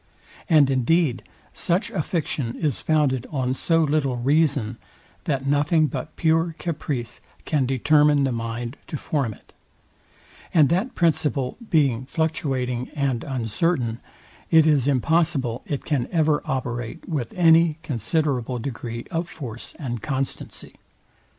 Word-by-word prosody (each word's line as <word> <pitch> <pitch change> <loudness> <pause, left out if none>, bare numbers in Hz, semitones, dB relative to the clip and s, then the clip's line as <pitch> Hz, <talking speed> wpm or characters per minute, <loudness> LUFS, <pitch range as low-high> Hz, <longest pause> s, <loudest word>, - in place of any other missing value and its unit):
And 150 -5 +5
indeed 130 -1 +2 0.3
such 185 +6 -1
a 195 - -1
fiction 145 -7 -2
is 150 -6 -1
founded 145 -5 +1
on 130 -3 -1
so 165 +4 +2
little 145 -4 +1
reason, 135 -3 +1 0.5
that 135 -2 -1
nothing 145 +3 +3
but 155 - -5
pure 165 0 +1
caprice 145 -8 -4 0.2
can 140 -5 +1
determine 145 +2 +4
the 135 - +1
mind 115 +2 -4
to 150 - -4
form 140 -5 -1
it; - - -24 1.0
and 150 -4 +6
that 185 +10 0
principle 150 -6 +1
being 130 -6 +2
fluctuating 135 -6 -1
and 135 -5 0
uncertain, 125 -1 -1 0.5
it 160 -1 +6
is 145 -4 +3
impossible 140 -3 +1
it 145 - -3
can 140 -6 0
ever 155 -3 +2
operate 125 +2 -4
with 145 -9 -3
any 165 -2 +5
considerable 130 - -1
degree 115 -1 -5
of 170 0 -2
force 120 -7 -8
and 120 -7 -4
constancy. 135 -2 -4
140 Hz, 125 wpm, -24 LUFS, 125-160 Hz, 1.0 s, and